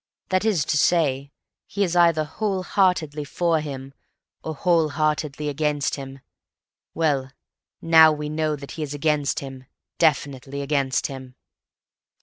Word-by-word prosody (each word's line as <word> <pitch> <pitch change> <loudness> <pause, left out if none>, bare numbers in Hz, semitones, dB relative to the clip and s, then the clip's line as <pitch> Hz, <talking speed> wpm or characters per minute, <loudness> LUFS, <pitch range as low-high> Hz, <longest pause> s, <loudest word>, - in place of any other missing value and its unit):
That 185 +1 +1
is 185 -10 +1
to 150 - 0
say, 140 -5 +1 0.4
he 200 - -1
is 180 -2 -1
either 170 -3 +4
whole 190 +4 -3
heartedly 170 -6 +1
for 165 +2 0
him 135 -2 -7 0.5
or 160 - -4
whole 165 0 +2
heartedly 150 -1 -1
against 145 0 -1
him. 135 -1 -7 0.7
Well, 145 -5 0 0.5
now 160 -1 +7
we 150 0 -4
know 155 0 -1
that 140 -1 -10
he 160 - -7
is 145 -1 -4
against 150 -1 0
him, 135 -2 -9 0.3
definitely 140 -3 0
against 140 -2 0
him." 130 -2 -7
150 Hz, 135 wpm, -23 LUFS, 140-165 Hz, 0.7 s, now